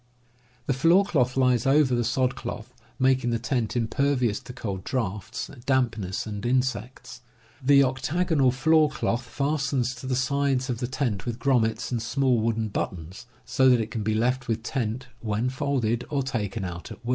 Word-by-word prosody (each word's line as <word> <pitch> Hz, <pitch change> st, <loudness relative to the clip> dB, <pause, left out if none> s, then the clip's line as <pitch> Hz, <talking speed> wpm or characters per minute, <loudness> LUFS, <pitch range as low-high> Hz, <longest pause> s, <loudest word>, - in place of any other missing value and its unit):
(Fig. 120 Hz, 0 st, -36 dB
3.) 125 Hz, -, -35 dB
The 135 Hz, -1 st, -1 dB
floor 175 Hz, +7 st, +5 dB
cloth 130 Hz, -9 st, +1 dB
lies 125 Hz, -2 st, +3 dB
over 135 Hz, -1 st, +4 dB
the 120 Hz, -1 st, +1 dB
sod 125 Hz, +2 st, +1 dB
cloth, 125 Hz, -1 st, -7 dB, 0.2 s
making 130 Hz, -2 st, +2 dB
the 115 Hz, -, +1 dB
tent 120 Hz, -1 st, -2 dB
impervious 120 Hz, -1 st, +1 dB
to -, -, -11 dB
cold 100 Hz, -6 st, -5 dB
draughts, 110 Hz, -2 st, -3 dB, 0.2 s
dampness, 115 Hz, -8 st, 0 dB
and 105 Hz, -1 st, -6 dB
insects. 125 Hz, 0 st, -2 dB, 0.4 s
The 140 Hz, +1 st, +6 dB
octagonal 140 Hz, +2 st, +1 dB
floor 155 Hz, +4 st, +3 dB
cloth 120 Hz, -3 st, -1 dB
fastens 135 Hz, -1 st, -1 dB
to 125 Hz, +1 st, -8 dB
the 130 Hz, -, 0 dB
sides 135 Hz, 0 st, 0 dB
of 120 Hz, -, -4 dB
the 125 Hz, -, -2 dB
tent 120 Hz, -5 st, -2 dB
with 115 Hz, -2 st, -2 dB
grommets 120 Hz, -3 st, +1 dB
and 120 Hz, -2 st, -1 dB
small 130 Hz, +1 st, +1 dB
wooden 110 Hz, -1 st, 0 dB
buttons, 95 Hz, +4 st, -5 dB, 0.2 s
so 130 Hz, +2 st, +3 dB
that 125 Hz, -2 st, +5 dB
it 110 Hz, 0 st, -3 dB
can 110 Hz, -, -3 dB
be 110 Hz, +1 st, 0 dB
left 125 Hz, +3 st, 0 dB
with 115 Hz, -1 st, -1 dB
tent 120 Hz, 0 st, -2 dB
when 110 Hz, +2 st, -1 dB
folded, 130 Hz, -4 st, -1 dB
or 140 Hz, -2 st, 0 dB
taken 115 Hz, -5 st, -3 dB
out 85 Hz, -1 st, -7 dB
at -, -, -11 dB
wiU. -, -, -4 dB
125 Hz, 180 wpm, -26 LUFS, 115-135 Hz, 0.4 s, The